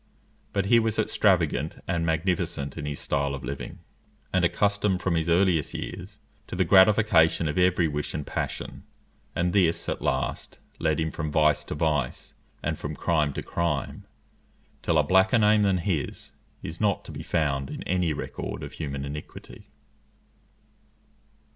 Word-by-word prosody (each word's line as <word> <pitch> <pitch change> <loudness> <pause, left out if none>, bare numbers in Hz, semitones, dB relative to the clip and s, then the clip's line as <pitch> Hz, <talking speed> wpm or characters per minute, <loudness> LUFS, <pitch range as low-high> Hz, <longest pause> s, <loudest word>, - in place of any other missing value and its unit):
But 100 -1 0
he 115 +3 +5
was 110 -1 0
extravagant 90 -8 +1
and 85 -3 0
magnificent 80 -3 -1
in 75 - -5
his 70 -1 -4
style 70 0 -1
of 65 - -8
living, - - -6 0.6
and 95 -1 +2
accustomed 100 +2 +1
from 95 -2 -1
his 80 0 0
earliest 85 -3 +2
years 95 +3 -6 0.3
to - - -6
the 95 0 +2
gratification 95 -4 +5
of 75 +3 -1
every 90 -2 +3
wish 75 -1 -3
and 75 - -3
passion; - - -4 0.5
and 90 +1 0
this, 90 -5 +2
at - - -3
last, - - -2 0.2
led 80 0 +1
him 80 0 -1
from 75 -2 -4
vice 75 -1 +3
to - - -5
vice 75 -5 -1 0.3
and - - -2
from 75 +1 -5
crime 80 -4 +1
to - - -4
crime, 85 -5 -2 0.7
till 85 - +1
a 75 - +5
blacker 95 +8 +4
name 105 -1 +4
than 100 -2 +3
his 85 -5 -3 0.3
is 80 +4 -6
not 105 -3 +1
to - - -8
be - - -7
found 70 -5 -1
in - - -6
any 90 -3 0
record 75 - -5
of - - -7
human 70 -3 -5
iniquity. 75 +2 -9
85 Hz, 160 wpm, -26 LUFS, 75-95 Hz, 0.7 s, he